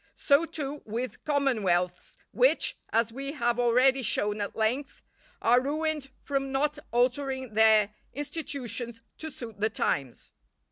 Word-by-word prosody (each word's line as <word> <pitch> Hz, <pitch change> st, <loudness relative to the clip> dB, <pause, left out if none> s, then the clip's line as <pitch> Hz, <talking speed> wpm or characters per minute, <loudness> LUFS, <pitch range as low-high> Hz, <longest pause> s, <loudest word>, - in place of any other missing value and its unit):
So, 285 Hz, +3 st, +3 dB
too, 295 Hz, -3 st, -5 dB
with 235 Hz, +4 st, -5 dB
commonwealths, 210 Hz, -, 0 dB
which, -, -, +3 dB
as 230 Hz, 0 st, +1 dB
we 275 Hz, +2 st, -4 dB
have 240 Hz, -4 st, 0 dB
already 255 Hz, +3 st, +4 dB
shown 210 Hz, -3 st, 0 dB
at 200 Hz, -, -4 dB
length, 245 Hz, +6 st, -1 dB, 0.4 s
are 245 Hz, +2 st, +5 dB
ruined 300 Hz, 0 st, -1 dB
from 275 Hz, -1 st, -1 dB
not 295 Hz, +2 st, 0 dB
altering 260 Hz, 0 st, 0 dB
their 215 Hz, -1 st, +5 dB, 0.2 s
institutions 260 Hz, -6 st, -5 dB, 0.2 s
to 315 Hz, -, -5 dB
suit 230 Hz, -7 st, -9 dB
the 215 Hz, +2 st, +2 dB
times. 135 Hz, -, -2 dB
255 Hz, 130 wpm, -28 LUFS, 220-285 Hz, 0.4 s, are